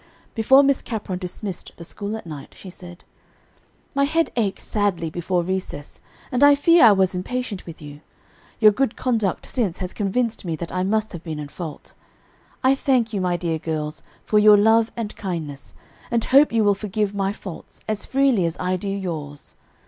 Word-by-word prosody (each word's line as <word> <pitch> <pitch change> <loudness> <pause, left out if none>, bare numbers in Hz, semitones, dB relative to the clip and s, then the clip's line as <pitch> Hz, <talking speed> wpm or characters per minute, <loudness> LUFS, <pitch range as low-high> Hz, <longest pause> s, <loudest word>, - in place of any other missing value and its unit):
Before 265 +5 +5
Miss 275 -1 +2
Capron 210 -6 -4
dismissed 185 +1 -6
the 170 - -9
school 205 +5 -5
at 220 - -11
night, 150 -4 -9
she 190 - -10
said: 175 -1 -12 0.9
"My 280 0 +2
head 325 +3 +1
ached 210 -5 -1
sadly 185 -6 -1
before 175 +1 -1
recess, 185 -5 -5 0.3
and 255 +1 +2
I 285 0 +8
fear 335 0 +6
I 220 - +9
was 190 -2 +3
impatient 210 +2 -4
with 165 -1 -10
you. 145 0 -10 0.6
Your 215 -2 +7
good 250 +2 0
conduct 225 -7 -1
since 220 -10 -1
has 185 -1 -5
convinced 225 +3 -1
me 170 -3 -2
that 165 +2 -6
I 185 - -1
must 215 +3 0
have 170 -1 -8
been 160 -3 -5
in 150 -1 -6
fault. 160 -2 -8 0.7
I 260 +1 +5
thank 255 -4 +1
you, 200 - -1
my 180 -1 0
dear 165 -2 -2
girls, 155 -1 -4 0.2
for 210 - +3
your 210 0 +7
love 220 +2 +4
and 220 -3 -4
kindness, 160 -8 -6 0.3
and 235 -1 +1
hope 280 +3 +5
you 225 -1 +2
will 205 -1 +4
forgive 205 0 -2
my 195 -1 0
faults 190 -4 -10
as 215 -1 -2
freely 265 -9 +2
as 165 - -5
I 185 0 0
do 195 +2 -4
yours. 160 -7 -5
200 Hz, 185 wpm, -22 LUFS, 175-225 Hz, 0.9 s, I